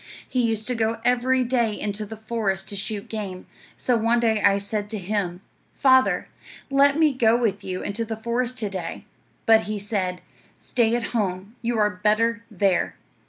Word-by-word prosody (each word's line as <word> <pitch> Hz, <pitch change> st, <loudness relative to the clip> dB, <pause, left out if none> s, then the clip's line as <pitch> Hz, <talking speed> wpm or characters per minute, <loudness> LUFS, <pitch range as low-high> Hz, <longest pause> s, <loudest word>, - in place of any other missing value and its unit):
He 255 Hz, -, 0 dB
used 225 Hz, -2 st, 0 dB
to 250 Hz, -, 0 dB
go 225 Hz, -1 st, 0 dB
every 250 Hz, +1 st, +3 dB
day 235 Hz, -4 st, 0 dB
into 210 Hz, 0 st, -3 dB
the 220 Hz, +1 st, -8 dB
forest 215 Hz, -4 st, -2 dB
to 205 Hz, -, -3 dB
shoot 205 Hz, +2 st, -3 dB
game; 200 Hz, -5 st, -5 dB, 0.3 s
so 250 Hz, -, +2 dB
one 230 Hz, +1 st, +2 dB
day 220 Hz, -2 st, +2 dB
I 200 Hz, -1 st, +4 dB
said 205 Hz, +1 st, -3 dB
to 220 Hz, -, -2 dB
him, 190 Hz, -2 st, -2 dB, 0.3 s
"Father, 260 Hz, -2 st, +4 dB, 0.4 s
let 280 Hz, +1 st, +5 dB
me 310 Hz, -3 st, +4 dB
go 235 Hz, -2 st, +4 dB
with 205 Hz, -4 st, -1 dB
you 185 Hz, -1 st, -4 dB
into 205 Hz, +3 st, -2 dB
the 225 Hz, 0 st, -5 dB
forest 240 Hz, +2 st, -2 dB
to 215 Hz, -4 st, -1 dB
day;" 180 Hz, -4 st, -5 dB, 0.4 s
but 225 Hz, -1 st, +5 dB
he 215 Hz, -, -1 dB
said, 195 Hz, -3 st, -2 dB, 0.4 s
"Stay 235 Hz, -1 st, +1 dB
at 240 Hz, -, -1 dB
home. 200 Hz, -1 st, -2 dB
You 235 Hz, 0 st, -1 dB
are 210 Hz, -1 st, +3 dB
better 230 Hz, +2 st, +2 dB
there." 195 Hz, -3 st, +1 dB
220 Hz, 180 wpm, -24 LUFS, 200-235 Hz, 0.4 s, let